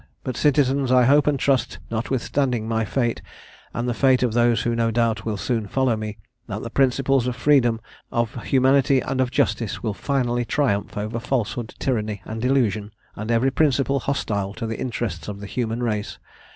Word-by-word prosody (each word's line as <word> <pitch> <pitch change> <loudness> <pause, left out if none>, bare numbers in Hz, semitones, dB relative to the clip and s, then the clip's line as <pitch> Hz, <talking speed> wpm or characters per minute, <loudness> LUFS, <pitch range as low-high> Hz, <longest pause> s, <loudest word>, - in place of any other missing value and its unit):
But, 130 - -3
citizens, 135 -1 +2
I 125 -1 +6
hope 145 +3 +4
and 145 -2 +2
trust, 130 -4 +1
notwithstanding 120 0 -1
my 110 -1 0
fate, 120 +1 -1 0.5
and 120 +1 -3
the 120 - 0
fate 130 +1 +3
of 120 -3 +1
those 120 0 +3
who 120 0 0
no 115 0 +1
doubt 115 -2 0
will 110 -2 -2
soon 110 0 -1
follow 130 +2 +1
me, 110 -1 -5 0.3
that 105 -1 -5
the 115 - -6
principles 135 -1 +2
of 125 - -2
freedom, 120 -3 +3 0.3
of 120 +1 -2
humanity, 135 0 +4
and 130 0 -1
of 130 - +1
justice, 115 -3 -1
will 110 -3 -1
finally 120 0 0
triumph 115 -5 -1
over 110 +3 -3
falsehood, 120 -2 -2
tyranny, 105 -6 -2
and 110 +1 -5
delusion, 115 -6 +1 0.3
and 110 +2 -6
every 120 +3 +2
principle 140 -1 +2
hostile 105 -8 -2
to 115 - -4
the 110 0 -4
interests 115 -9 -3
of 100 -1 -6
the 100 - -7
human 115 +3 -2
race. 105 -3 -2
120 Hz, 180 wpm, -23 LUFS, 110-130 Hz, 0.5 s, I